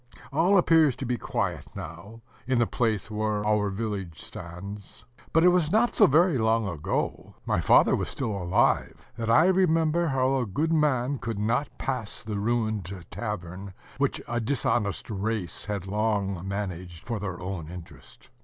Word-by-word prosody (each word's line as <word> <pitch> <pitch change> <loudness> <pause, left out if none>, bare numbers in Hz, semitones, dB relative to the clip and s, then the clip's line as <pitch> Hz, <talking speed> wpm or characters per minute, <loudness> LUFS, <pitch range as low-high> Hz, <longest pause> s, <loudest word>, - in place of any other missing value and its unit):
All 175 +7 +4
appears 160 -6 +5
to 130 - -5
be 120 -1 -1
quiet - - -2
now, 85 +8 -9 0.3
in 130 -1 +2
the 120 - +4
place 110 -3 -1
where 105 -1 -1
our 105 -1 +2
village 95 -5 -4
stands; 100 +5 -8 0.3
but 165 - +4
it 180 - +8
was 175 -3 +2
not 230 +4 +3
so - - +6
very 155 0 +4
long 110 -1 +2
ago 85 -6 -3
my - - +1
father - - +5
was - - -2
still 125 -5 -2
alive 95 -3 +1
that 115 -1 -3
I 115 +9 +6
remember 170 -3 +3
how 135 -1 +2
a 120 - -1
good 155 +11 0
man 140 -4 +1
could 115 -2 -4
not 115 +7 -1
pass 125 -6 -3
the 105 -3 -3
ruined 110 -4 -1 0.2
tavern, 95 -3 -5 0.2
which - - +1
a 120 - -1
dishonest 115 -4 0
race 100 -3 -2
had 100 -3 -3
long 100 -3 -1
managed 90 -4 -5
for 115 -3 -3
their 95 -3 -4
own 90 -4 -5
interest. 90 -1 -12
110 Hz, 165 wpm, -27 LUFS, 100-135 Hz, 0.3 s, it